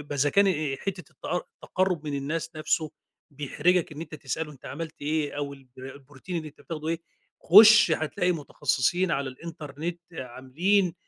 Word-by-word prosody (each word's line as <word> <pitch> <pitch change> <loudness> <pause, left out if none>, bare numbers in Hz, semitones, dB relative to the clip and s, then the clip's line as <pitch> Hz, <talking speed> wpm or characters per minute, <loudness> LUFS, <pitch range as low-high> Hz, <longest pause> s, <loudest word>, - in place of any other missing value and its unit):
بإذا 145 -1 0
كان 200 0 +5
آآ، 155 -7 0
حتة 195 +5 -4
التقر 175 +1 -3
التقرُّب 185 -4 -1
من 145 - -3
الناس 155 +4 -3
نفسه 155 0 0 0.4
بيحرِجك، 155 +5 +1
إن 150 - -8
أنت 165 - -7
تسألُه 150 +1 -4
أنت 135 - -18
عملت 160 +2 -6
إيه 150 0 0
أو 145 -1 -3
البر 130 -1 -11
البروتين 145 +5 -8
اللي 155 -2 -4
أنت 145 - -19
بتاخدُه 155 -1 -6
إيه، 165 0 -1 0.4
خُشّ 215 0 +9
هتلاقي 160 +3 +1
متخصّصين 170 +2 0
على 135 -2 0
الإنترنت 160 +2 -6
عاملين، 160 +9 0
155 Hz, 155 wpm, -27 LUFS, 140-175 Hz, 0.4 s, خُشّ